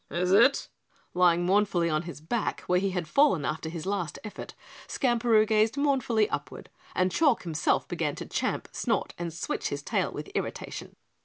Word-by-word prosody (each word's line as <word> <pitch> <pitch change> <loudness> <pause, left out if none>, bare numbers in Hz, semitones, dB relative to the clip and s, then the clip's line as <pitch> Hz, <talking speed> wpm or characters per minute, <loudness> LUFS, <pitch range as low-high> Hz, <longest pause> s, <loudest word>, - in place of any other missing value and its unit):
"Is 180 +4 -1
it?" 235 +8 +5 0.5
Lying 175 -1 +3
mournfully 190 -3 +2
on 155 -1 +1
his 170 -3 -9
back 215 +8 -2
where 180 0 +1
he 195 +1 0
had 180 -3 -3
fallen 190 - +3
after 160 +1 -3
his 165 -1 -6
last 190 -6 -2
effort, 210 - -8 0.3
Skamperoo 235 -4 +3
gazed 220 +3 +2
mournfully 260 -7 +2
upward - - -5 0.2
and 185 0 +2
Chalk 290 - +2
himself 160 -4 0
began - - -2
to - - -6
champ, - - -2
snort - - -1
and 170 -1 -3
switch 165 - -3
his 145 0 -4
tail - - 0
with - - -7
irritation. - - -5
185 Hz, 170 wpm, -28 LUFS, 170-225 Hz, 0.5 s, it